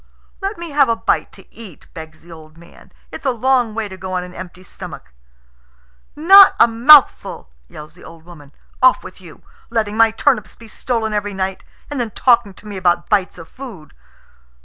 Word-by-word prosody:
"Let 390 +2 -4
me 340 -2 -8
have 280 -3 +2
a 230 - +1
bite - - -2
to - - -17
eat," 210 -9 -13
begs 160 -1 -12
the 170 - -16
old 160 -1 -15
man. 170 0 -19 0.2
"It's - - -10
a 275 - 0
long 245 -2 0
way 225 -2 -3
to 190 -1 -11
go 185 0 -7
on 180 -1 -2
an 180 0 -12
empty 185 0 -11
stomach." 180 - -12 1.0
"Not 385 +6 +7
a 230 - +6
mouthful!" 240 - +4 0.2
yells 150 - -13
the 175 - -18
old 165 -1 -15
woman. 150 -5 -15 0.3
"Off 255 0 +3
with 185 - -13
you. 170 -4 -16 0.3
Letting 215 -2 -2
my 225 0 +5
turnips 225 0 -1
be 230 - -16
stolen 220 -1 -4
every 205 -1 -3
night, 190 0 -4 0.3
and 280 -4 -3
then 235 - -3
talking 235 -4 +1
to 210 - -15
me 205 -2 -7
about 175 -2 0
bites 200 -4 0
of 165 -1 -12
food!" 220 - -12
210 Hz, 195 wpm, -17 LUFS, 175-240 Hz, 1.0 s, Not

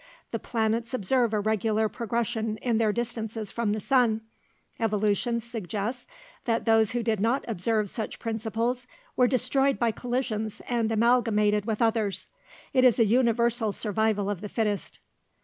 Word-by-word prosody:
The - - -2
planets 230 +1 -1
observe 240 +2 +1
a 215 - +1
regular 220 +1 +1
progression 225 -1 -2
in 230 0 0
their 220 -2 +3
distances 225 -2 -4
from 235 -3 -1
the 215 - -1
sun. 230 -1 +2 0.6
Evolution 215 +2 +1
suggests 225 +1 -4 0.4
that 230 -1 0
those 225 -1 +4
that 240 -1 -1
did 220 -2 0
not 230 +6 +1
observe 215 0 0
such 220 +2 -4
principles 230 +2 -2 0.3
were 250 - +4
destroyed 270 +2 +2
by 235 -2 +2
collisions 230 -3 -3
and 230 -2 0
amalgamated 220 -3 +3
with 220 0 0
others. 220 -3 0 0.4
It 255 -2 +4
is 250 -3 +5
a 230 - +5
universal 235 -1 +2
survival 215 -1 0
of 205 -3 -3
the 210 - -6
fittest." 210 -3 -2
225 Hz, 150 wpm, -27 LUFS, 215-240 Hz, 0.6 s, is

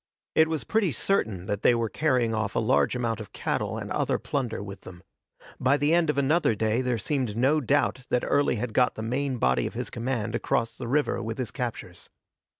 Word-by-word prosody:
It 160 0 +5
was 160 -2 -2
pretty 215 -6 +1
certain 110 - 0
that 105 +1 -2
they 120 - +5
were 115 -1 0
carrying 125 -3 +1
off 110 -2 -2
a - - +3
large 110 +2 +2
amount 115 -2 -1
of 110 - -9
cattle - - -2
and - - -6
other - - +1
plunder 125 -7 -3
with 100 -1 -9
them. 90 -1 -12 0.6
By 130 +3 +3
the 145 +3 +2
end 170 -2 +3
of 150 - +1
another 140 -3 +2
day 110 +3 +1
there 125 -2 0
seemed 120 -1 -2
no 140 +6 +3
doubt 130 -1 0
that 125 - +1
Early 145 -3 +2
had 115 0 -3
got 125 +1 +3
the 110 - -5
main 130 +3 -1
body 65 - +2
of - - -8
his - - -4
command 120 -2 -2
across 115 0 0
the 120 - -6
river 145 -1 +1
with 115 0 -4
his 130 -4 -3
captures. 125 -4 -6
125 Hz, 215 wpm, -27 LUFS, 110-140 Hz, 0.6 s, It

